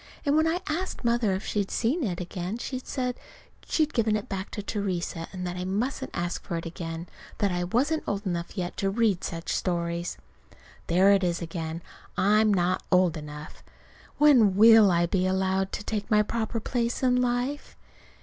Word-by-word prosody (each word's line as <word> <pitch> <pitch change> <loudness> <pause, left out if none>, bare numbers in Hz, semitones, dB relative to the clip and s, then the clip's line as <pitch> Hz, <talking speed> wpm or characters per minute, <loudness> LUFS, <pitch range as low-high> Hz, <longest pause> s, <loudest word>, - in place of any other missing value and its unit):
And 285 0 +3
when 315 +1 +4
I 345 +3 0
asked 330 -3 -3
Mother 235 -4 +2
if 190 +2 -3
she'd 200 -2 -1
seen 275 +8 0
it, 180 +1 -4
she 255 -2 -4
said 250 -1 -3 0.5
she'd 310 -1 +1
given 220 -2 +2
it 210 - -3
back 190 0 -4
to 205 - -6
Theresa, 185 -5 -3
and 180 -1 -5
that 180 0 -3
I 180 - -4
mustn't 210 +8 -2
ask 175 +1 -2
for 170 - -4
it 165 - -5
again. 165 0 -5 0.3
That 200 -2 +1
I 175 0 -1
wasn't 275 - 0
old 200 +1 -2
enough 175 +1 -3
yet 180 -1 -3
to 195 - 0
read 210 -3 +1
such 165 0 -3
stories. 170 -1 -2 0.7
There 185 +4 +5
it 195 -1 +4
is 175 -1 0
again! 165 -1 -5 0.3
I'm 210 +2 +4
not 180 -2 +1
old 180 -3 +4
enough. 150 -1 -9 0.6
When 250 -10 +6
will 220 0 +8
I 175 -1 +3
be 185 +1 +1
allowed 190 0 0
to 210 - -4
take 210 0 -3
my 210 -2 +4
proper 230 +1 -2
place 235 +2 -2
in 250 -1 +4
life? 250 +4 -2
195 Hz, 180 wpm, -27 LUFS, 175-235 Hz, 0.7 s, will